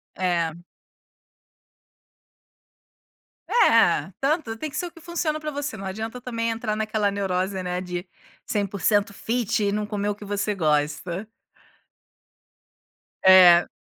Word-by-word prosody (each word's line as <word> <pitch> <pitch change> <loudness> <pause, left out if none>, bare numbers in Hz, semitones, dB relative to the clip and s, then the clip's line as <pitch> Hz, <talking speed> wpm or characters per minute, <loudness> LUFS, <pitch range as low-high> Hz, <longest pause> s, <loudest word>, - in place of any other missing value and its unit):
É. 175 -3 0 3.0
É, 225 - +4
tanto 275 -5 0
tem 305 +5 -5
que 305 - -8
ser 355 - -2
o - - -8
que 330 - -15
funciona 325 -2 -2
pra 305 0 -4
você, 290 0 -4
não 195 - -8
adianta 220 +5 -5
também 230 -2 -2
entrar 225 -1 -2
naquela 215 -1 0
neurose, 190 -1 -2
né, 180 0 -3
de 180 0 -5 0.4
100% 205 +1 0
fit 225 -1 -1
e 200 - +1
não 210 0 -1
comer 205 -1 -2
o 205 - 0
que 205 0 -12
você 205 +1 -1
gosta. 160 +4 -1 2.0
É. 180 -2 +8
205 Hz, 125 wpm, -24 LUFS, 185-230 Hz, 3.0 s, É